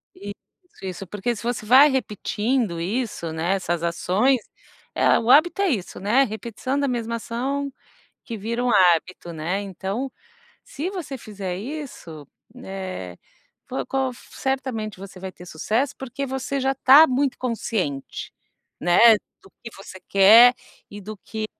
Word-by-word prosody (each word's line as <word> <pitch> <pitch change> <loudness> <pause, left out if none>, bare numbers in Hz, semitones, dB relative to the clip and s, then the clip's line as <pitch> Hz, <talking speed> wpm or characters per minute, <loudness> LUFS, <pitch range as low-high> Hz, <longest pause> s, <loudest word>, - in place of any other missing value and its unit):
Isso, 200 0 -7 0.5
isso. 190 0 -6
Porque 210 +5 -2
se 215 - -9
você 235 -2 -3
vai 265 +6 +7
repetindo 220 -4 -1
isso, 190 -3 -3
né, 165 +4 -1
essas 175 -3 -2
ações, 195 +10 +2 0.6
eh, - - +4
o 230 - -3
hábito 345 +8 +5
é 395 - +2
isso, 195 - -3
né, 225 +8 +3
repetição 235 +4 -3
da 280 - +1
mesma 230 -2 -2
ação 270 +5 -3 0.5
que 230 -3 -6
vira 230 +4 -3
um 245 - +1
hábito, 175 -2 +2
né. 170 +6 -2
Então, 200 +7 -4 0.5
se 315 +6 -5
você 345 -9 -6
fizer 195 -5 -6
isso, 210 - -8 0.4
eh, 185 - -6 0.5
po 260 - -3
qual 265 -1 0
certamente 245 -7 -4
você 195 -1 -10
vai 190 0 -6
ter 180 - -13
sucesso, 220 - -1
porque 265 +1 -5
você 265 +1 -3
já 270 +1 0
tá 275 +4 +7
muito 265 +1 0
consciente, 215 - -3 0.5
né, 220 +6 +6 0.3
do 195 - -18
que 230 - -7
você 190 -1 -11
quer, 220 +5 +8 0.4
e 205 - -9
do 215 +2 -8
que 220 +2 -5
220 Hz, 145 wpm, -23 LUFS, 190-260 Hz, 0.6 s, quer